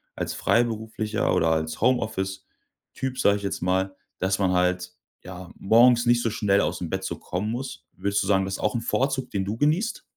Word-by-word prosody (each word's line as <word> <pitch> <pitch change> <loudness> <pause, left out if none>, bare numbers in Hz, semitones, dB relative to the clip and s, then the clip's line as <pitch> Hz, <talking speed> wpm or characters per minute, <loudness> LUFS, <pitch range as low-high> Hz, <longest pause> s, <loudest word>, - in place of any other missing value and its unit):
als - - -3
Freiberufler 110 -2 0
oder 80 - +2
als 80 0 -1
Homeoffice-Typ, 110 +2 -3
sage 100 0 +4
ich 100 - -9
jetzt 100 - -3
mal, 95 +1 0 0.2
dass 95 +1 0
man 95 -2 +2
halt, 90 0 0 0.3
ja, 90 -1 -9
morgens 120 +3 +5
nicht 120 0 +4
so 115 - +1
schnell 105 -4 +2
aus'm 85 -3 -2
Bett 95 0 -3
so - - -4
kommen 100 +5 -3
muss. 115 -10 -6
Würdest 100 +2 -1
du - - -4
sagen, 95 -2 +3
das 95 - -3
ist - - -7
auch 105 - 0
'n 115 - -1
Vorzug, 135 +2 -1
den 95 -2 -1
du 105 +3 -3
genießt? 165 - 0
100 Hz, 195 wpm, -25 LUFS, 95-120 Hz, 0.3 s, morgens